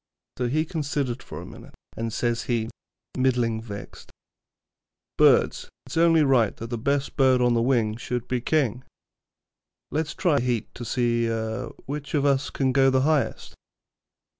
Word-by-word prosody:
So 125 - +1
he 155 +6 +1
considered 140 -6 -2
for - - -8
a - - -8
minute, - - -13 0.2
and 115 0 -3
says 120 +1 -1
he, 115 -2 -1 0.5
middling 120 -4 +1
vexed: 105 -3 -9 1.1
'Birds, - - +3 0.2
it's - - -8
only 165 -1 +5
right 130 -6 +3
that 115 +1 -7
the 120 - -1
best 140 +3 -1
bird 130 -2 +4
on 125 -1 +3
the 115 - +2
wing 115 -3 +1
should 125 0 -4
be 125 -1 -1
king; 130 -4 0 1.1
let's 155 +2 -2
try 170 -6 +2
a - - +1
heat 120 -3 -2
to 120 - -8
see 120 -1 0 0.6
which 145 +2 -5
of 145 -1 +2
us 140 -1 +2
can 135 -2 0
go 135 0 +4
the 130 0 +2
highest.' 150 0 0
130 Hz, 160 wpm, -25 LUFS, 120-140 Hz, 1.1 s, only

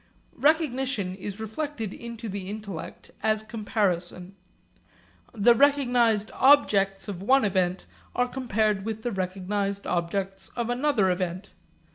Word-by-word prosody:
Recognition 265 - +1
is 200 +2 -7
reflected 220 0 -4
into 235 -1 -7
the 195 -2 -5
intellect 205 -5 -7
as 215 0 +1
comparison. 195 -4 -2 1.0
The 235 +1 +5
recognised 245 -5 +3
objects 200 -9 +4
of 190 -3 -5
one 260 +4 +4
event 185 -2 0 0.3
are 245 0 +2
compared 215 -6 0
with 220 0 -4
the 240 - -1
recognised 195 +1 -2
objects 190 +3 -2
of 240 -1 -1
another 245 -7 +2
event. 185 +1 -3
210 Hz, 115 wpm, -26 LUFS, 195-240 Hz, 1.0 s, The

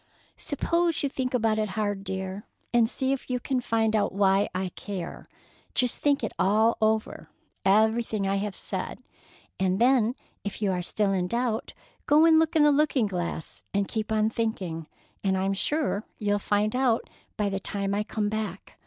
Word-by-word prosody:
"Suppose 335 +3 0
you 280 - +1
think 255 -1 -2
about 220 -2 +2
it 215 -1 0
hard, 205 -2 -1
dear, 190 +1 -5 0.3
and 235 -2 +4
see 265 +1 0
if 270 - -5
you 250 0 0
can 255 0 -1
find 225 -2 +1
out 210 - +2
why 195 0 +3
I 185 0 -1
care. 185 -1 -7 0.5
Just 250 -1 +2
think 285 -3 +2
it 220 - -1
all 220 +4 +4
over, 220 0 0 0.3
everything 220 +1 +2
I 195 +1 +1
have 200 0 -3
said, - - -5 0.6
and 190 0 +2
then 245 -1 +4 0.3
if 205 - -5
you 205 -3 +1
are 180 -1 -1
still 200 +3 0
in 180 -2 0
doubt 235 +1 -2 0.3
go 300 +2 +6
and 320 -1 +6
look 320 0 +1
in 310 - +6
the 295 - +6
looking 285 -4 +3
glass 175 -5 -4
and 200 -1 +1
keep 220 -1 -3
on 215 0 +2
thinking, 185 -9 -3 0.4
and 190 -1 +2
I'm 195 +1 +1
sure 265 0 -1
you'll 205 -1 0
find 210 +2 0
out 250 -3 +2 0.3
by 210 -1 +1
the 195 0 -2
time 200 0 -1
I 205 - +1
come 210 0 -2
back. 210 -3 -5
215 Hz, 180 wpm, -27 LUFS, 195-245 Hz, 0.6 s, go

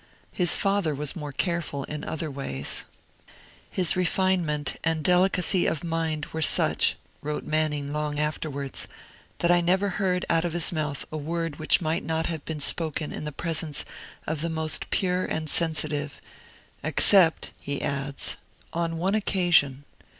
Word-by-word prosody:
His 175 -3 +4
father 195 -6 +1
was 145 0 -3
more 150 -4 -5
careful 170 -3 -2
in 150 +1 -6
other 155 -1 -3
ways. 70 - -1 0.8
'His 180 -3 +3
refinement 180 -5 +1
and 160 -1 0
delicacy 180 +1 +3
of 160 - -1
mind 165 -2 -1
were 160 - -2
such,' - - +3 0.3
wrote 150 0 -3
Manning 150 -2 -1
long 150 -1 -2
afterwards, 150 -2 -2 0.5
'that 175 - +2
I 175 0 +5
never 190 +4 +2
heard 185 -1 0
out 165 -1 +2
of 175 -2 -2
his 175 +2 +3
mouth 150 -4 -2
a 155 - -3
word 165 0 -3
which 155 +4 +3
might 160 0 -1
not 160 +1 -1
have 160 -4 -3
been 160 -2 -4
spoken 155 0 0
in - - -5
the 150 - -3
presence 155 0 -1 0.4
of 155 -1 -2
the 170 - -1
most 160 -1 0
pure 180 -1 +1
and 155 0 -2
sensitive 150 -3 0 0.6
except,' 180 -5 +4
he 140 0 -3
adds, 140 0 -2 0.4
'on 165 -1 -1
one 185 +4 0
occasion. 175 -10 +2
160 Hz, 150 wpm, -26 LUFS, 150-175 Hz, 0.8 s, I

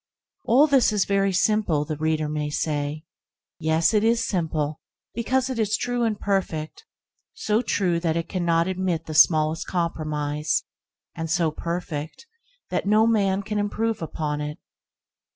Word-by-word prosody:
All 265 +6 +6
this 275 -7 +4
is 210 -2 +1
very 195 0 +1
simple, 185 -6 +1
the 155 0 -3
reader 155 0 0
may 150 0 -2
say. 150 +1 -2 0.5
Yes, 160 +4 +2
it 210 -1 +3
is 230 +1 +2
simple 155 -5 -1 0.3
because 255 +3 0
it 260 -3 -3
is 215 -1 +1
true 245 0 -2
and 215 -2 -1
perfect; 190 - -2 0.5
so 215 +2 +1
true 180 -8 0
that 165 -1 0
it 165 - -2
cannot 170 -2 +1
admit 185 -3 -1
the 155 - -6
smallest 155 0 +4
compromise, 155 -3 -1 0.5
and 165 0 -5
so 165 -2 +1
perfect 165 - -5 0.5
that - - -1
no 215 +2 +5
man 200 -3 +2
can 210 0 -2
improve 220 +1 -1
upon 150 -2 -3
it. 150 0 -5
170 Hz, 150 wpm, -24 LUFS, 155-210 Hz, 0.5 s, All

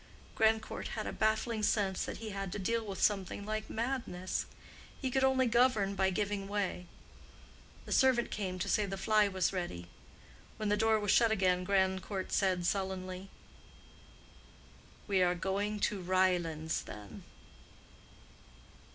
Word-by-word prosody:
Grandcourt 220 0 +1
had - - -2
a - - -4
baffling 220 +1 0
sense 200 -3 +1
that - - -5
he 220 -1 -6
had 195 -2 -4
to - - -3
deal 230 +4 0
with 200 -3 -6
something 200 -1 0
like 215 0 -3
madness; 225 -7 -2 0.5
he 260 -2 -2
could 265 +1 +2
only 265 -1 +4
govern 235 -4 +3
by 190 -1 +2
giving 200 0 -2
way. 195 -3 -2 1.0
The - - -9
servant 255 -3 +3
came 185 -3 -3
to 185 - -3
say 210 -1 +2
the 195 0 -4
fly 210 +2 +3
was 190 -1 0
ready. 90 - -4 0.7
When 215 -1 -2
the 205 - +3
door 220 0 +3
was 205 -2 +1
shut 230 -1 +5
again 185 -3 +2
Grandcourt 190 0 0
said 185 -3 +1
sullenly, 190 0 -2 1.8
"We 195 -2 +2
are 180 0 +3
going 200 +4 -2
to 200 -2 0
Ryelands 175 -4 +1
then." 105 -1 -9
195 Hz, 145 wpm, -33 LUFS, 185-215 Hz, 1.8 s, shut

